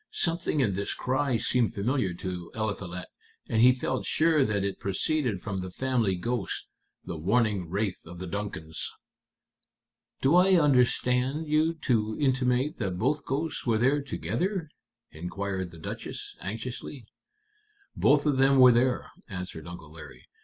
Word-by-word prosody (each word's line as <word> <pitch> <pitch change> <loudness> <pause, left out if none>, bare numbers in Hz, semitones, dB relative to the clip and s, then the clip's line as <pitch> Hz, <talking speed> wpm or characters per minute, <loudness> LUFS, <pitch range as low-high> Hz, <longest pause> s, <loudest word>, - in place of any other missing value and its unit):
Something 165 -3 0
in 105 -7 +2
this 100 +2 -2
cry 130 -1 0
seemed 120 0 +1
familiar 110 -1 0
to 90 -1 -6
Eliphalet, 100 -5 -3 0.4
and 110 - +2
he 125 +2 +8
felt 130 0 -2
sure 155 -2 +3
that 105 -4 0
it 100 0 -2
proceeded 110 - 0
from 100 -3 -3
the 95 0 -4
family 115 -1 0
ghost, 115 +2 -2 0.4
the 85 - -5
warning 100 -1 +1
wraith 100 +1 -1
of 90 +1 -9
the 95 - -5
Duncans." 90 -4 -4 1.3
"Do 135 +3 +3
I 185 0 +6
understand 130 +1 +2
you 155 +2 +2
to 110 -3 +1
intimate 130 0 +1
that 95 -5 -2
both 140 +8 0
ghosts 145 +1 -2
were 115 -2 +3
there 135 +6 +3
together?" 150 - -2 0.4
inquired 95 +3 -4
the 85 - -13
Duchess, 80 - -6
anxiously. 115 +4 -6 0.9
"Both 145 +1 +4
of 145 -3 +2
them 135 +1 +5
were 125 -1 +9
there," 125 +1 +1 0.2
answered 90 -5 -6
Uncle 85 -3 -9
Larry. 80 0 -12
115 Hz, 145 wpm, -28 LUFS, 95-135 Hz, 1.3 s, were